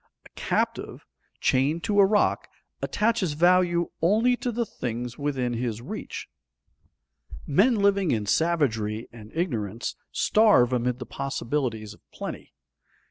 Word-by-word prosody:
A - - -15
captive, - - -2 0.3
chained 145 +6 +1
to 205 -1 +1
a 200 - +8
rock, 210 0 +1 0.3
attaches 210 -7 0
value 175 +1 +3
only 220 +9 +3
to 245 - -2
the 235 +1 -1
things 120 - -5
within 135 -4 -1
his 115 -2 -2
reach. 205 - -7 1.2
Men 195 - +3
living 200 -3 +2
in 110 -5 0
savagery 115 -7 0
and 110 -2 -12
ignorance 115 - -2 0.2
starve 205 - +4
amid 125 0 0
the - - -7
possibilities 125 -5 -3
of - - -20
plenty. - - -7
145 Hz, 125 wpm, -26 LUFS, 120-195 Hz, 1.2 s, a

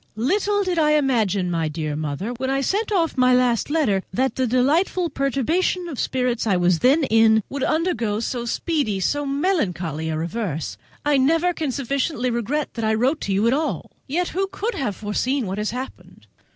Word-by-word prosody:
Little 405 - +1
did 360 -3 0
I 300 -1 +4
imagine, 220 -11 +1
my 165 -2 0
dear 155 -1 -3
Mother, 155 +8 -3
when 260 +2 -3
I 270 0 +1
sent 410 - -1
off 330 -8 +1
my 255 0 +5
last 250 -1 +2
letter, 285 -12 +1
that 260 +7 0
the 260 -1 0
delightful 315 - +1
perturbation 280 +7 0
of 290 -7 -6
spirits 250 -3 -1
I 195 -4 +3
was 175 -1 +2
then 280 +5 +4
in 220 -3 +4
would 280 - -5
undergo 240 - 0
so 235 +1 -3
speedy, 240 - -1
so 290 +9 0
melancholy 185 - -1
a 155 - -2
reverse. 165 -1 -3 0.3
I 295 -1 +3
never 330 +6 +2
can 310 -5 -2
sufficiently 270 0 -1
regret 240 +6 -2
that 230 - -4
I 220 0 +2
wrote 260 +8 +1
to 200 - -3
you 195 +3 +2
at 235 - +3
all. 305 +3 -2 0.2
Yet 340 +6 -1
who 390 +2 -1
could 405 +4 -3
have 240 -8 -2
foreseen 240 +5 -1
what 190 +2 -3
has 210 - -1
happened? 255 +3 -8
255 Hz, 190 wpm, -22 LUFS, 210-305 Hz, 0.3 s, my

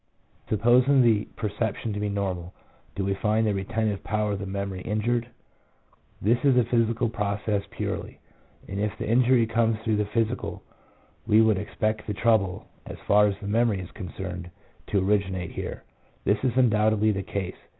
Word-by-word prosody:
Supposing 125 +5 +4
the 110 -3 +3
perception 110 +1 -2
to 105 - -3
be 105 0 -1
normal, 95 -3 -3 0.4
do 100 - -2
we 100 - +1
find 110 +3 +1
the 105 - +1
retentive 105 +1 -2
power 105 0 -1
of 100 - -2
the 100 - -5
memory 100 -1 -4
injured? 115 +3 -1 0.9
This 115 +6 +1
is 135 -3 +4
a 125 - +5
physical 115 0 +1
process 105 -1 -1
purely, - - -5 0.5
and 100 - -4
if 105 0 -2
the - - -4
injury 120 +1 +4
comes 115 0 +1
through 110 -2 +1
the 105 - +1
physical, 115 +3 -2 0.6
we 105 - +5
would 110 -3 +4
expect 110 +1 -2
the 105 - -2
trouble, 105 -5 +1 0.2
as - - -7
far 105 +1 +6
as 100 - -1
the 100 - -6
memory 110 -1 +2
is 90 - -8
concerned, 90 -1 -6 0.4
to 105 - 0
originate 95 -4 0
here. - - -6 0.4
This 105 +3 +1
is 125 -2 0
undoubtedly 110 -3 +3
the 95 -1 -2
case. 95 -1 -4
105 Hz, 170 wpm, -26 LUFS, 100-115 Hz, 0.9 s, far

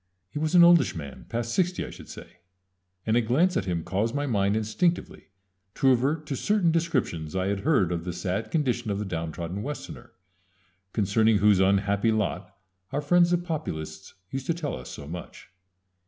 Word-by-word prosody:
He 150 - -4
was 155 +3 0
an 175 - +9
oldish 170 -1 +5
man, 70 -4 -8
past 115 0 -2
sixty, 180 -1 0
I - - -8
should - - -12
say, - - -11 0.7
and 110 - +2
a 120 - +4
glance 145 +11 +2
at 95 - 0
him 85 -3 -2
caused 105 - -1
my 145 0 0
mind 100 -5 +1
instinctively 170 - -1 0.5
to 135 - +3
revert 140 +5 +2
to 140 - -3
certain 200 - +2
descriptions 130 - -1
I 95 +1 0
had 100 -1 -1
heard 100 - +2
of 85 -1 -2
the 90 - -3
sad 90 +4 -3
condition 125 -7 0
of 100 - -1
the 105 - -3
downtrodden 85 +1 -4
Westerner, 145 +5 -7 0.8
concerning 110 +1 +3
whose 100 -1 +4
unhappy 100 +3 +2
lot 110 -3 -2 0.4
our 140 - -1
friends 175 +3 +4
the 175 - +3
Populists 155 - -5 0.2
used 135 -1 -4
to 170 - +1
tell 155 -5 -3
us 60 - -9
so 70 - -8
much. 85 +3 -9
115 Hz, 185 wpm, -26 LUFS, 95-155 Hz, 0.8 s, an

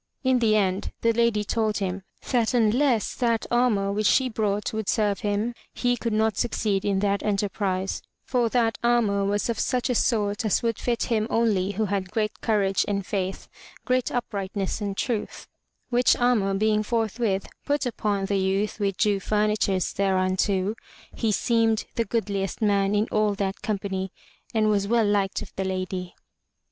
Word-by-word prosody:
In 260 -1 +3
the 220 -2 +3
end 195 -2 0
the 230 0 +3
Lady 230 -2 +2
told 215 0 0
him 195 -1 -2 0.3
that 245 -1 +2
unless 235 0 +2
that 230 -3 0
armor 230 -5 +2
which 210 +1 +1
she 260 -1 +3
brought 210 -2 -1
would 220 -2 -2
serve 210 -3 +1
him, 210 +2 -1 0.2
he 245 -1 +1
could 230 0 -3
not 215 -1 +1
succeed 210 -4 0
in 200 -1 +1
that 200 0 +1
enterprise; 195 -2 -1 0.2
for 245 -3 +1
that 230 -1 +1
armor 225 -4 +2
was 205 +1 0
of 235 - -2
such 250 0 0
a - - +2
sort 210 -2 +1
as 215 +1 +1
would 230 -2 0
fit 240 -2 0
him 220 -2 0
only 205 -4 +1
who 215 +3 0
had 195 -2 -2
great 215 +1 -2
courage 200 -4 +2
and 200 -2 -1
faith, 190 -1 -3 0.4
great 255 -1 +1
uprightness 200 -4 -3
and 200 -1 -3
truth; 230 -5 -3 0.4
which 245 +1 +4
armor 225 -6 +2
being 215 +1 +2
forthwith 225 -2 -1 0.2
put 290 -1 0
upon 210 -5 -1
the 195 0 0
youth 195 +3 0
with 195 -2 -1
due 205 -2 +2
furnitures 210 -2 0
thereunto, 190 +1 +1 0.4
he 225 -2 0
seemed 225 0 +2
the 230 - 0
goodliest 200 -4 -2
man 200 -2 +2
in 210 +1 +2
all 215 -1 +2
that 195 -1 -3
company 195 -3 -3 0.4
and 220 -1 +2
was 200 -2 +1
well 230 0 +3
liked 205 0 0
of 205 - -13
the 190 - 0
Lady. 185 -1 -4
210 Hz, 170 wpm, -25 LUFS, 195-230 Hz, 0.4 s, which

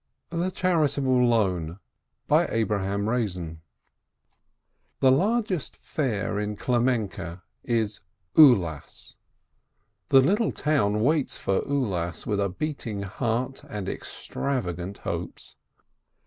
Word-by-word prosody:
THE 170 +2 0
CHAEITABLE 145 -9 +2
LOAN 90 -8 +1 0.5
The 100 -4 0 1.5
largest 195 - +1
fair 105 -8 -2
in 105 0 -2
Klemenke 115 -9 -1 0.2
is 110 -3 -1 0.4
"Ulas." 95 - +4 1.0
The 135 - +7
little 205 - +2
town 105 -9 +1
waits 150 +1 +1
for 95 - 0
Ulas 95 - -1
with 105 -2 0
a 100 -1 +1
beating 115 -3 -4
heart 120 +6 -2
and 105 -3 -5
extrava 125 -11 -3
gant 90 +3 -6
hopes. - - -6
115 Hz, 90 wpm, -26 LUFS, 100-140 Hz, 1.5 s, The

